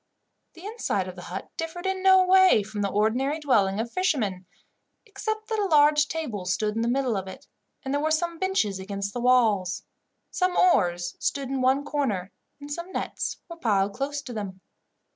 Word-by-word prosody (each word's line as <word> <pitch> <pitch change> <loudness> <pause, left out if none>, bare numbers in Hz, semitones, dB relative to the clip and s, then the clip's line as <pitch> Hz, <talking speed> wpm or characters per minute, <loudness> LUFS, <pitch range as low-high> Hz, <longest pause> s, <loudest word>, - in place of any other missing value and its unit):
The 345 +3 -12
inside 410 - -2
of 185 - -8
the 180 - -9
hut 185 +2 -6
differed 330 +2 -5
in 380 0 -1
no 380 -1 +6
way 375 - +6
from 210 0 -5
the 200 - 0
ordinary 245 +9 +1
dwelling 210 -9 +2
of 230 +1 -3
fishermen, 220 - -1 0.6
except 435 +1 -4
that 445 -1 -1
a 410 - +1
large 295 -2 +5
table 245 - -4
stood 210 +4 0
in 225 - 0
the 230 - 0
middle 255 -1 +1
of 190 -1 -3
it, 270 +9 -10 0.4
and 265 - -2
there 285 - +1
were 310 - +1
some 335 +1 -1
benches 300 - 0
against 200 +1 -4
the 245 - -3
walls. 220 -7 +2 0.5
Some 365 -1 0
oars 175 - +2
stood 275 -2 -2
in 270 -1 -1
one 265 +3 +2
corner, 210 -12 -2 0.3
and 290 0 -9
some 340 +4 -6
nets - - -3
were 335 -2 -9
piled 200 -8 +1
close 285 +4 -3
to 250 - -7
them. 195 -4 -6
265 Hz, 190 wpm, -26 LUFS, 200-335 Hz, 0.6 s, no